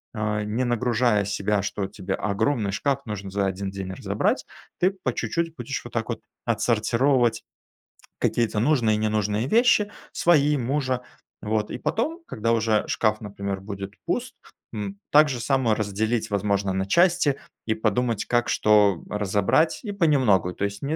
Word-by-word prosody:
э, 105 Hz, -1 st, -1 dB
не 110 Hz, +5 st, -1 dB
нагружая 120 Hz, -3 st, +1 dB
себя, 100 Hz, 0 st, 0 dB
что 100 Hz, 0 st, -3 dB
тебе 95 Hz, -1 st, -4 dB
огромный 105 Hz, +1 st, 0 dB
шкаф 140 Hz, +6 st, -1 dB
нужно 100 Hz, -3 st, -5 dB
за 100 Hz, +1 st, 0 dB
1 95 Hz, +1 st, -2 dB
день 95 Hz, -1 st, -6 dB
разобрать, -, -, -1 dB, 0.3 s
ты 180 Hz, -, +4 dB
по 190 Hz, -2 st, -3 dB
чуть-чуть 165 Hz, -1 st, -2 dB
будешь 120 Hz, -5 st, -5 dB
вот -, -, -10 dB
так -, -, -2 dB
вот -, -, -3 dB, 0.2 s
отсортировать 120 Hz, -2 st, +2 dB, 0.8 s
какие-то 115 Hz, -3 st, +1 dB
нужные 120 Hz, -3 st, +3 dB
и -, -, -3 dB
ненужные 105 Hz, +1 st, 0 dB
вещи: 220 Hz, -, +4 dB, 0.2 s
свои, 150 Hz, -3 st, +3 dB
мужа, 130 Hz, 0 st, -1 dB, 0.4 s
вот. 105 Hz, 0 st, -1 dB
И -, -, -5 dB
потом, 320 Hz, +10 st, -1 dB
когда 115 Hz, +1 st, -1 dB
уже 110 Hz, -2 st, +2 dB
шкаф, 110 Hz, -1 st, +1 dB
например, 100 Hz, -2 st, -5 dB
будет 100 Hz, 0 st, -7 dB
пуст, -, -, -2 dB, 0.4 s
м, 100 Hz, -2 st, -5 dB
так 150 Hz, +1 st, +6 dB
же 130 Hz, -3 st, -3 dB
само 125 Hz, -2 st, +1 dB
разделить, 110 Hz, +2 st, -1 dB
возможно, 100 Hz, -1 st, 0 dB
на 95 Hz, 0 st, -1 dB
части, 170 Hz, -, +3 dB, 0.3 s
и 110 Hz, -, +1 dB
подумать, 110 Hz, +1 st, 0 dB
как 120 Hz, 0 st, +1 dB
что 105 Hz, -4 st, +4 dB
разобрать, 105 Hz, -, +1 dB
и 205 Hz, -3 st, -4 dB
понемногу- 130 Hz, -, +3 dB
то 100 Hz, -, -2 dB
есть 100 Hz, 0 st, -5 dB
не 145 Hz, +3 st, -1 dB
110 Hz, 160 wpm, -24 LUFS, 100-130 Hz, 0.8 s, так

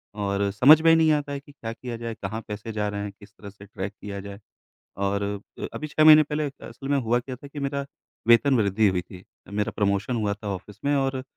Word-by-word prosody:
और 100 Hz, -1 st, 0 dB
समझ 135 Hz, +10 st, +7 dB
में 165 Hz, -, +5 dB
ही -, -, +7 dB
नहीं 160 Hz, -1 st, +4 dB
आता 145 Hz, -1 st, -1 dB
है 140 Hz, -, -3 dB
कि 145 Hz, +1 st, -17 dB
क्या 115 Hz, -5 st, -7 dB
किया 120 Hz, 0 st, -7 dB
जाए, 115 Hz, 0 st, -5 dB
कहाँ 110 Hz, +4 st, -3 dB
पैसे 105 Hz, +1 st, -6 dB
जा 105 Hz, -1 st, -1 dB
रहे 100 Hz, 0 st, -4 dB
हैं, 100 Hz, -, -5 dB
किस 100 Hz, -1 st, -15 dB
तरह 100 Hz, -1 st, -11 dB
से 100 Hz, 0 st, -14 dB
ट्रैक 100 Hz, 0 st, -6 dB
किया 100 Hz, -1 st, -6 dB
जाए? 100 Hz, 0 st, -9 dB, 0.6 s
और 100 Hz, +1 st, 0 dB, 0.4 s
अ, -, -, -3 dB
अभी 155 Hz, -, -5 dB
6 155 Hz, +1 st, +2 dB
महीने 155 Hz, 0 st, +9 dB
पहले 150 Hz, 0 st, -2 dB, 0.2 s
असल 130 Hz, +4 st, -9 dB
में 145 Hz, -, +3 dB
हुआ 120 Hz, -2 st, +1 dB
क्या 130 Hz, +1 st, -7 dB
था 140 Hz, +3 st, -12 dB
कि 145 Hz, +1 st, -8 dB
मेरा 140 Hz, 0 st, -2 dB, 0.4 s
वेतन 125 Hz, +4 st, +5 dB
वृद्धि 105 Hz, 0 st, +3 dB
हुई 90 Hz, -2 st, +1 dB
थी, 90 Hz, +1 st, -13 dB, 0.2 s
मेरा 105 Hz, 0 st, -1 dB
प्रमोशन 100 Hz, +3 st, 0 dB
हुआ 105 Hz, -3 st, 0 dB
था 105 Hz, +1 st, -9 dB
ऑफिस 100 Hz, +2 st, -12 dB
में 145 Hz, 0 st, +3 dB
और 135 Hz, -1 st, 0 dB
115 Hz, 245 wpm, -25 LUFS, 100-140 Hz, 0.6 s, महीने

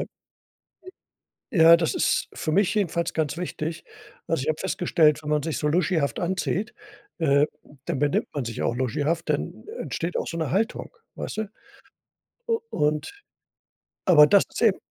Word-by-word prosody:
j -, -, -3 dB, 1.4 s
Ja, 170 Hz, -6 st, +7 dB
das 165 Hz, -2 st, -1 dB
ist -, -, +1 dB
für 155 Hz, -, -3 dB
mich 200 Hz, +4 st, +2 dB
jedenfalls 170 Hz, -4 st, 0 dB
ganz 155 Hz, 0 st, -1 dB
wichtig. 170 Hz, -2 st, -5 dB, 0.4 s
Also, 165 Hz, -5 st, 0 dB
ich 155 Hz, -, -2 dB
habe 155 Hz, -, -1 dB
festgestellt, 165 Hz, -5 st, +2 dB
wenn 150 Hz, -, -5 dB
man 150 Hz, 0 st, +2 dB
sich 160 Hz, -1 st, -2 dB
so 150 Hz, -, -1 dB
luschihaft 160 Hz, -3 st, +1 dB
anzieht, 185 Hz, +3 st, -2 dB, 0.5 s
äh, 140 Hz, -2 st, +4 dB, 0.4 s
dann 130 Hz, -, -2 dB
benimmt 145 Hz, -1 st, +1 dB
man 145 Hz, -, -2 dB
sich 115 Hz, -, -5 dB
auch 120 Hz, -, 0 dB
luschihaft, 145 Hz, +7 st, -1 dB
dann -, -, -2 dB, 0.2 s
entsteht 170 Hz, +2 st, -3 dB
auch -, -, -2 dB
so -, -, -5 dB
'ne 160 Hz, -4 st, -2 dB
Haltung, 220 Hz, +6 st, -1 dB, 0.2 s
weißt -, -, -6 dB
du? 220 Hz, -2 st, -3 dB, 1.0 s
U 455 Hz, -1 st, +1 dB
und 150 Hz, -, 0 dB, 0.9 s
aber 150 Hz, -5 st, +8 dB
das 200 Hz, +4 st, +5 dB
ist -, -, -6 dB
eben 220 Hz, -5 st, +4 dB
165 Hz, 160 wpm, -25 LUFS, 150-180 Hz, 1.4 s, aber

